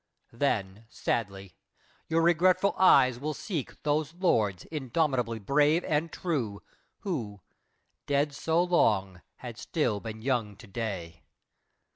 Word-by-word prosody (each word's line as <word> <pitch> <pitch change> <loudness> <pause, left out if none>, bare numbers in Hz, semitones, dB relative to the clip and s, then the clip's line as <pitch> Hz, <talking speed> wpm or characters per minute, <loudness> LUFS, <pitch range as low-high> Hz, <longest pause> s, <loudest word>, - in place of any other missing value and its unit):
Then, 110 -5 -1
sadly, 100 -7 -3 0.5
your 165 0 +2
regretful 180 +3 +3
eyes 130 -9 +5
will 150 +2 -3
seek 165 - -5
Those 150 +2 0
lords 110 - +1
indomitably 130 -5 0
brave 145 - +2
and 155 +2 -1
true, 125 - -3 0.4
Who, 115 - -4 0.7
dead 145 +1 +1
so 160 +4 +1
long, 100 - +1
had 120 -3 -9
still 125 -11 -1
been 110 0 -8
young 120 -6 -1
to 115 - -14
day. 95 -6 -5
130 Hz, 115 wpm, -28 LUFS, 105-160 Hz, 0.7 s, eyes